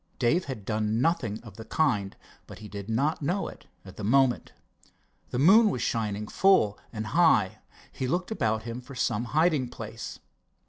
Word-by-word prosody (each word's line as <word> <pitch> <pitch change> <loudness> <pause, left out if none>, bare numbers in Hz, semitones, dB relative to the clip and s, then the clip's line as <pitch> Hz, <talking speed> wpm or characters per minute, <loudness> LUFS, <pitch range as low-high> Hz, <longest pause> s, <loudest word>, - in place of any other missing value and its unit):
Dave 155 +9 +2
had 125 -8 -6
done 110 +1 0
nothing 125 -7 0
of 110 -4 -12
the 110 - -7
kind, 105 -12 0 0.3
but - - -10
he 110 - -10
did 100 0 -8
not 140 +9 0
know 180 +7 -1
it - - -12 0.2
at 95 - -12
the 110 - -6
moment. 130 +3 +2 0.8
The - - -3
moon 205 - +6
was 125 - -2
shining 105 -2 -2
full 150 - +3
and 110 -2 -4
high. 110 - +3 0.3
He 130 - -3
looked 180 - -1
about 110 - 0
him 115 +2 -6
for 130 +2 -12
some 120 -2 0
hiding 155 -2 +2
place. 115 -2 -7
120 Hz, 175 wpm, -27 LUFS, 110-150 Hz, 0.8 s, moon